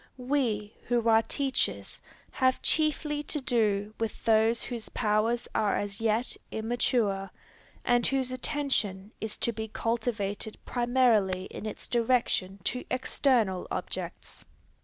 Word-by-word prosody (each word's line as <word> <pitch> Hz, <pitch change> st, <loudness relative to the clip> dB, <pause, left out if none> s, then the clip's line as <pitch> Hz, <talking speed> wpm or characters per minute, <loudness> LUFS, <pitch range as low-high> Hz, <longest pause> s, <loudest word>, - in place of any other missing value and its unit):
We, 245 Hz, -5 st, -1 dB
who 235 Hz, -1 st, +1 dB
are 225 Hz, 0 st, +6 dB
teachers, 270 Hz, +3 st, -1 dB, 0.3 s
have 260 Hz, 0 st, +1 dB
chiefly 300 Hz, -1 st, +2 dB
to 295 Hz, +1 st, -1 dB
do 215 Hz, -5 st, +1 dB
with 225 Hz, -1 st, -4 dB
those 225 Hz, +1 st, +4 dB
whose 235 Hz, -3 st, -6 dB
powers 220 Hz, +3 st, +1 dB
are 210 Hz, -2 st, +2 dB
as 205 Hz, +1 st, -4 dB
yet 225 Hz, +2 st, +1 dB
immature, 220 Hz, -3 st, 0 dB, 0.6 s
and 245 Hz, -1 st, +3 dB
whose 265 Hz, -2 st, 0 dB
attention 235 Hz, -7 st, -1 dB
is 220 Hz, -1 st, -4 dB
to 235 Hz, -, +1 dB
be 220 Hz, 0 st, -4 dB
cultivated 220 Hz, -3 st, -2 dB
primarily 240 Hz, -7 st, +2 dB
in 215 Hz, -, -6 dB
its 215 Hz, -, -5 dB
direction 230 Hz, -5 st, +1 dB
to 250 Hz, -, -2 dB
external 240 Hz, -7 st, +1 dB
objects. -, -, -4 dB
230 Hz, 120 wpm, -29 LUFS, 210-255 Hz, 0.6 s, are